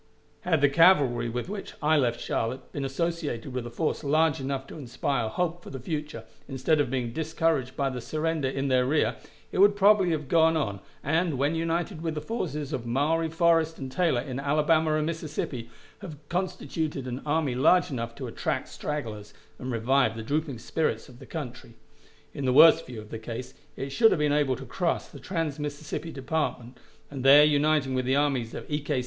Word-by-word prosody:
Had 160 -5 +1
the 145 - +6
cavalry 140 -6 +4
with 120 +5 -4
which 200 0 -6
I 155 +1 +3
left 120 -5 +1
Charlotte 125 +4 -3
been 140 - -4
associated 145 -3 -3
with 125 -2 -3
a - - -6
force 155 +7 -2
large 155 0 +2
enough 135 0 -3
to 135 - -10
inspire 125 -2 -2
hope 175 +6 -2
for - - -11
the 135 - -6
future, 150 -3 -5 0.2
instead 140 +3 +1
of 140 - -1
being 125 -3 -2
discouraged 160 -4 0
by 140 -1 0
the 125 -1 -5
surrender 155 +2 -1
in 135 +1 -2
their 130 -1 +2
rear, 150 +3 +1 0.3
it - - -3
would 200 +1 +6
probably 200 -2 +5
have 155 -4 -2
gone 160 +1 +4
on, 100 -10 -2 0.2
and, 160 0 +1
when 140 +4 +1
united 165 +2 -2
with 165 -2 -2
the - - -2
forces 150 - -4
of 120 -3 -3
Maury, 155 +7 +1
Forrest, 165 -1 +2
and 135 -2 -6
Taylor, 165 -7 +1
in 130 0 -5
Alabama 155 +2 +2
and 155 0 0
Mississippi, 155 -7 -4 0.3
have 155 -6 -8
constituted 170 -6 -3
an 125 +1 -5
army 150 -3 0
large 160 +7 +4
enough 115 -3 -4
to - - -6
attract - - -3
stragglers, 110 -9 -5 0.2
and 130 0 -4
revive 120 0 +2
the 115 - -6
drooping 145 +1 -2
spirits 115 0 -2
of 125 -1 -15
the - - -12
country. 125 -6 -7 0.6
In 140 - -4
the 130 - +2
worst 160 +3 +7
view 120 -3 -7
of 105 0 -12
the 115 - -5
case 115 +3 -7 0.2
it 135 - -5
should 225 - +5
have - - +2
been 150 -1 +2
able 145 -3 +2
to 135 - -9
cross 175 +3 -1
the - - -12
trans 165 -6 -3
Mississippi 150 +2 -5
Department, 130 -4 -3 0.3
and 135 -3 -5
there 140 +2 +8
uniting 150 -2 +2
with 130 -1 0
the 130 +1 +2
armies 135 -5 0
of - - -6
E. 150 0 -2
K. 145 -2 -1
145 Hz, 200 wpm, -27 LUFS, 130-160 Hz, 0.6 s, there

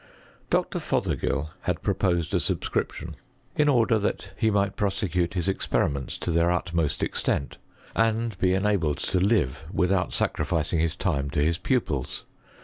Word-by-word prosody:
Dr. - - +1
Fothergill 70 +2 -1
had 90 -2 -1
proposed 90 -5 +1
a - - +3
subscrip - - 0
tion, - - -8 0.4
in 150 -1 +3
order 115 -4 +4
that 105 - -2
he 110 - +2
might 100 -2 +1
prosecute 95 -3 0
his 90 0 0
experiments 70 -8 0
to 85 - -2
their 85 +1 +3
utmost 85 -3 0
extent, 70 - -1 0.4
and 115 -1 +1
be 95 0 +3
enabled 95 -7 +1
to 95 - 0
live 85 - +1
with 95 -1 +1
out 95 -2 +1
sacrificing 80 0 0
his 80 +1 +1
time 70 -7 -1
to 75 +1 +1
his 80 +3 +1
pupils. 90 - -1
90 Hz, 150 wpm, -26 LUFS, 80-100 Hz, 0.4 s, order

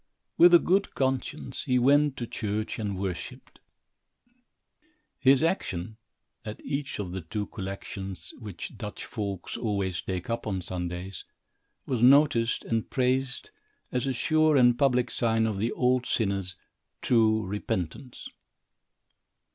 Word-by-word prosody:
With 175 0 +8
a - - +11
good 195 +4 +1
conscience, 135 +2 -2
he 125 -3 +2
went 140 +3 +4
to 120 - -3
church 110 -1 -3
and 100 -3 -2
worshipped. 95 -3 -6 1.6
His 135 +2 +5
action, 110 - -1 0.5
at 105 -2 -7
each 140 0 -3
of 95 -4 -4
the 95 +1 -4
two 105 +6 -4
collections, 95 -3 -6
which 105 -7 -7
Dutch - - -6
folks 100 -4 -5
always 100 -5 -1
take 90 -2 -4
up 115 -1 -3
on 95 -3 -2
Sundays, 90 0 -5 0.6
was 125 -4 -1
noticed 130 -2 +5
and 115 -1 -1
praised 130 0 0 0.4
as 125 +2 -1
a 135 - 0
sure 155 +3 +3
and 120 -2 +6
public 125 -2 +2
sign 115 -1 +2
of 105 -3 -2
the 115 +3 0
old 125 0 +1
sinner's 95 -4 -1 0.5
true 110 -3 +3
repentance. 100 - -4
115 Hz, 130 wpm, -27 LUFS, 95-130 Hz, 1.6 s, a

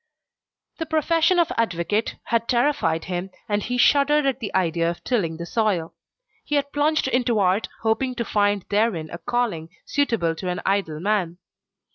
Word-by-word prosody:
The 325 - -3
profession 330 +3 +2
of 340 -2 +3
advocate 210 0 0
had 230 0 0
terrified 245 - +1
him, 180 +1 -4 0.2
and 205 -1 0
he 245 +4 -2
shuddered 290 +3 +4
at 270 -1 0
the 220 -5 -4
idea 170 -2 +1
of 170 - -6
tilling 175 -10 -1
the 170 - -5
soil. 190 -4 0 0.5
He 295 - -2
had 285 0 0
plunged 300 0 +2
into 250 -3 +1
art, 195 +1 +2
hoping 250 +3 0
to 235 - -2
find 205 -2 +1
therein 200 -7 0
a 170 - -6
calling 235 -10 -2 0.2
suitable 230 -13 0
to 185 - -4
an 180 0 -2
idle 190 -6 0
man. 185 -2 0
215 Hz, 165 wpm, -23 LUFS, 175-265 Hz, 0.5 s, shuddered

